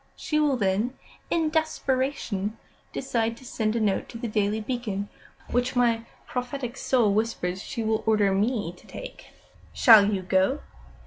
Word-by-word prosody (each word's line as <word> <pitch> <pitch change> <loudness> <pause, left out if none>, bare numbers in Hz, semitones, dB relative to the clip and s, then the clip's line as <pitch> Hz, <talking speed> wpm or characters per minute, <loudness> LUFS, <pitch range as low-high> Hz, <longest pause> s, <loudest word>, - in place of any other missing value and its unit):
She 305 - -1
will 290 -3 +2
then, 210 +4 0 0.3
in 320 -2 +1
desperation, 260 - -1 0.3
decide 230 -3 -1
to 260 - -14
send 220 -3 -1
a - - +1
note 210 -3 0
to 230 - -7
The 235 +1 -4
Daily 210 0 0
Beacon, 215 -4 -3 0.4
which, 245 +1 0
my 230 -2 +2 0.2
prophetic 250 0 -4
soul 240 -7 +2
whispers, 200 -4 -1
she 230 +1 -4
will 220 0 +1
order 210 -3 +4
me 205 -3 0
to - - -19
take." - - -9 0.5
"Shall 215 -4 +7
you 190 -2 -1
go?" 190 +9 +2
230 Hz, 150 wpm, -26 LUFS, 205-255 Hz, 0.5 s, Shall